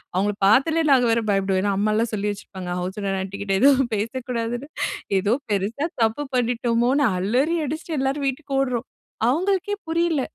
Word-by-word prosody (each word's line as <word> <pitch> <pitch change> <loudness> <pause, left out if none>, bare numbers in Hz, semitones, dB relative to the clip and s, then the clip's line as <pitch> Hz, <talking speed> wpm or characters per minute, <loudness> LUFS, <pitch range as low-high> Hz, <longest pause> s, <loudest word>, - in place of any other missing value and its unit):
அவுங்கள 205 +3 +1
பாத்தாலே 315 +10 +4
நாங்க 255 -2 +5
வேற 230 0 +2
பயப்படுவேன். 195 -1 +1
ஏன்னா 200 -1 +1
அம்மாலாம் 215 +3 +1
சொல்லி 210 0 -1
வச்சிருப்பாங்க. 190 -2 -8
ஹவுஸ் 185 +3 -4
ஓனர் 195 -1 -1
ஆண்டிக்கிட்ட 200 +1 -3
எதுவும் 270 -2 +5
பேசக்கூடாதுன்னு 240 +3 -3 0.5
ஏதோ 205 +4 +1 0.2
பெரிசா 210 +9 -1 0.2
தப்பு 225 +6 0
பண்ணிட்டோமோன்னு 245 +3 +2
அலறி 255 - +1
அடிச்சிட்டு 310 +2 -4
எல்லாரும் 275 +1 -1
வீட்டுக்கு 275 +1 -4
ஓடுறோம். 250 -2 -2 0.4
அவுங்களுக்கே 380 +7 0
புரியல! 330 -3 +1
240 Hz, 145 wpm, -23 LUFS, 205-280 Hz, 0.5 s, நாங்க